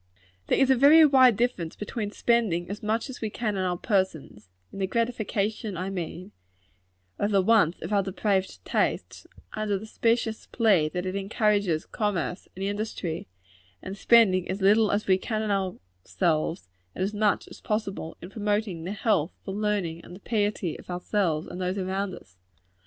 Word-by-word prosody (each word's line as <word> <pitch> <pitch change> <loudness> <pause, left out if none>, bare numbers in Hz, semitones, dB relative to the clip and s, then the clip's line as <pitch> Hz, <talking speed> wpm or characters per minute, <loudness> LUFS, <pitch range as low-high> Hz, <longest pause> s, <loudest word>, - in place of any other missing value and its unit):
There - - +2
is 270 -1 +4
a - - +6
very 295 +5 +8
wide 260 -6 +6
difference 195 -9 -1
between 210 0 -4
spending 205 -6 +1
as 205 - -6
much 220 +2 -1
as 260 - -9
we 220 - -1
can 215 -1 -2
on 190 - -1
our 180 -1 -1
persons 170 - -2 0.2
in - - -7
the 190 - 0
gratification, 215 -2 -1
I 185 +2 -3
mean, 180 +1 -5 0.9
of 205 - +1
the 195 -2 +3
wants 200 -5 +3
of 175 +6 -3
our 200 - +4
depraved 195 0 -1
tastes, - - -1 0.3
under 215 -2 -1
the 205 - -8
specious 230 0 0
plea 200 -10 +3
that 180 +3 -4
it 185 +1 -3
encourages 200 -4 +1
commerce 190 -4 -2
and 190 +1 -4
industry 200 -5 -3 0.5
and 190 - -7
spending 195 -4 +4
as 190 +2 -2
little 210 +2 +4
as 205 +1 0
we 190 -1 +3
can 215 0 -2
on 195 -3 -1 0.3
ourselves, 165 - -1 0.3
and - - -1
as 200 +3 -2
much 210 -1 +1
as - - -13
possible 200 -6 -3
in 180 - -9
promoting 205 -5 -2
the 190 - -3
health, 205 -6 +1
the 195 - -4
learning, 195 -5 -2
and 175 - -11
the - - -12
piety 205 -7 -1
of - - -15
ourselves 175 -3 -1
and 180 - -7
those 185 +2 -1
around 190 0 -2
us. 90 -1 -17
200 Hz, 175 wpm, -26 LUFS, 185-215 Hz, 0.9 s, very